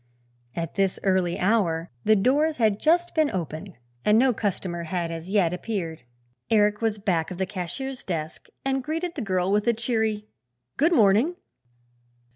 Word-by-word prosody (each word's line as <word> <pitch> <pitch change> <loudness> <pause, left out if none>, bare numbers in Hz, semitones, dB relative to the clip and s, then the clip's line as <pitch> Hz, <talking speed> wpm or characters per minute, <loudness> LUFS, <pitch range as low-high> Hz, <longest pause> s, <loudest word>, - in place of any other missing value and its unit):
At 165 -1 -3
this 195 -2 0
early 185 -3 +1
hour 180 -5 +1
the 215 - +5
doors 290 +9 +2
had 215 -4 +2
just 345 +2 +2
been 310 -2 +3
opened 175 +1 -5 0.3
and 210 +1 +4
no 255 +1 +4
customer 180 -5 -3
had 170 0 -2
as 165 +2 -6
yet 190 -4 +2
appeared. 180 -5 -4 0.5
Eric 210 -1 +3
was 220 -2 0
back 180 -5 0
of 180 - -6
the 190 - 0
cashier's 210 +8 -5
desk 160 -3 -5 0.2
and 270 -1 0
greeted 330 +4 -3
the 290 - -5
girl 185 -3 0
with 210 +2 +1
a 235 - +5
cheery 220 -2 -1 0.5
"good 320 +5 +3
morning." 230 - +4
205 Hz, 160 wpm, -25 LUFS, 180-240 Hz, 0.5 s, the